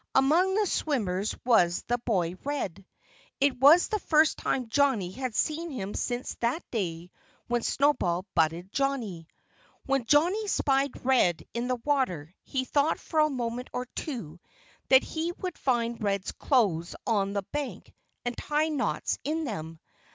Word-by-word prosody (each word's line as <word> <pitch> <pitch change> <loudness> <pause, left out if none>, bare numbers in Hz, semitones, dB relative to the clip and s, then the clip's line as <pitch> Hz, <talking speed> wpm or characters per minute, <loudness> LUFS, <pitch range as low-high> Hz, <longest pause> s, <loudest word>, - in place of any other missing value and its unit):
Among 330 +8 +4
the 425 0 +3
swimmers 215 - -1
was 180 -8 +3
the 245 +1 -1
boy 185 -8 0
Red. 200 - -4 0.5
It 275 -2 +2
was 295 +7 +7
the 430 - -1
first 310 -3 +3
time 255 -3 -1
Johnnie 230 -8 +2
had 255 +1 -4
seen 325 +2 0
him 205 -8 -5
since 245 +1 -3
that 240 +8 0
day 175 -5 -3 0.3
when 240 0 0
Snowball 205 -12 +1
butted 165 +4 +1
Johnnie. 235 - -2 0.6
When 270 -3 0
Johnnie 350 - +3
spied 275 -8 0
Red 245 -10 +3
in 235 +1 -2
the 255 - +1
water 185 - 0
he 260 -2 -3
thought 290 +4 +1
for 315 - -2
a 305 0 +5
moment 245 -2 -3
or 250 - -2
two 205 - -5 0.5
that 265 0 +7
he 330 +2 -3
would 365 -1 -5
find 235 -3 0
Red's 200 -2 -1
clothes 190 - +1
on 200 -4 +1
the 200 -1 -1
bank 290 -2 -5 0.3
and 245 0 -2
tie 300 +4 0
knots 300 -3 -1
in 320 +2 -1
them. 165 - -5
250 Hz, 150 wpm, -28 LUFS, 195-290 Hz, 0.6 s, was